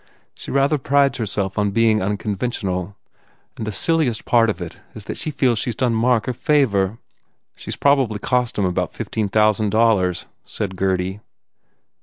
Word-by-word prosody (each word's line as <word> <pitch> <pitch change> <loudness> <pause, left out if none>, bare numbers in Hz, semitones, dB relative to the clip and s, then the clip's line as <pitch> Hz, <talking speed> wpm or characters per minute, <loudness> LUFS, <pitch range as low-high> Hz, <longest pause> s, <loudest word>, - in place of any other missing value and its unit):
She - - -10
rather 140 +2 +2
prides 140 0 +2
her 110 - -1
self 100 0 -2
on 105 0 +2
being 110 +1 +2
unconventional. 100 -2 -2 0.6
And 110 - -5
the - - -1
silliest 150 - 0
part 115 -2 +4
of 105 - -2
it 85 -2 -8
is 105 - -7
that - - -5
she - - -3
feels 125 -6 +1
she 120 - -2
s 115 - -3
done 125 -1 +1
Mark 115 0 +2
a 125 - 0
favour." 115 -8 +1 0.6
"She - - -11
s - - -3
probably 135 -7 +2
cost 125 +2 0
him 100 - +1
about 90 -1 -1
fifteen 110 -3 -3
thousand 110 0 +2
dollars," 100 -5 +2 0.2
said 95 -3 -4
Gurdy. 95 +1 -1
110 Hz, 175 wpm, -21 LUFS, 100-125 Hz, 0.6 s, part